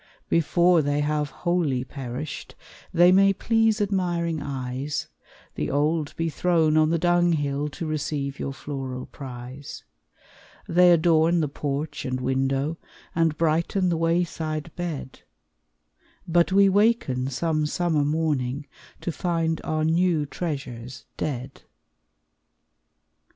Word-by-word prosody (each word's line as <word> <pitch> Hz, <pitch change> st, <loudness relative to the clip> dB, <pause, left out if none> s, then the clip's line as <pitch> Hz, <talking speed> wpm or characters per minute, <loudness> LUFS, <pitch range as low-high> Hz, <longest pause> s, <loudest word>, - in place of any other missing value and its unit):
Before 170 Hz, +1 st, +4 dB
they 145 Hz, 0 st, 0 dB
have 150 Hz, 0 st, 0 dB
wholly 135 Hz, -1 st, 0 dB
perished 135 Hz, +2 st, -6 dB, 0.4 s
They 175 Hz, +1 st, +6 dB
may 195 Hz, +1 st, +5 dB
please 225 Hz, +2 st, +2 dB
admiring 175 Hz, -5 st, 0 dB
eyes, 135 Hz, +1 st, -4 dB, 0.4 s
The -, -, -3 dB
old 150 Hz, +2 st, 0 dB
be 165 Hz, -, -1 dB
thrown 165 Hz, -1 st, +2 dB
on 155 Hz, 0 st, +4 dB
the 170 Hz, -, +2 dB
dunghill, 160 Hz, -4 st, +1 dB
To 165 Hz, -, -6 dB
receive 150 Hz, -3 st, -3 dB
your 135 Hz, -, -3 dB
floral 135 Hz, -2 st, -5 dB
prize; 130 Hz, +1 st, -9 dB, 0.8 s
They 180 Hz, +1 st, +5 dB
adorn 165 Hz, 0 st, +4 dB
the 155 Hz, -, +1 dB
porch 145 Hz, +1 st, -4 dB
and 130 Hz, -1 st, -2 dB
window, 135 Hz, +4 st, 0 dB, 0.4 s
And 165 Hz, -2 st, +1 dB
brighten 170 Hz, +4 st, +1 dB
the 170 Hz, -, +1 dB
wayside 165 Hz, -2 st, -1 dB
bed, 160 Hz, -7 st, -5 dB, 1.1 s
But 170 Hz, +2 st, +3 dB
we 200 Hz, +1 st, +6 dB
waken 195 Hz, -, +2 dB
some 155 Hz, +2 st, 0 dB
summer 160 Hz, -2 st, +1 dB
morning 145 Hz, -3 st, -1 dB, 0.4 s
To 175 Hz, -, -2 dB
find 165 Hz, -2 st, -1 dB
our 155 Hz, 0 st, 0 dB
new 165 Hz, -1 st, +2 dB
treasures 135 Hz, -6 st, -5 dB
dead. 130 Hz, -2 st, -4 dB
155 Hz, 115 wpm, -25 LUFS, 140-170 Hz, 1.1 s, They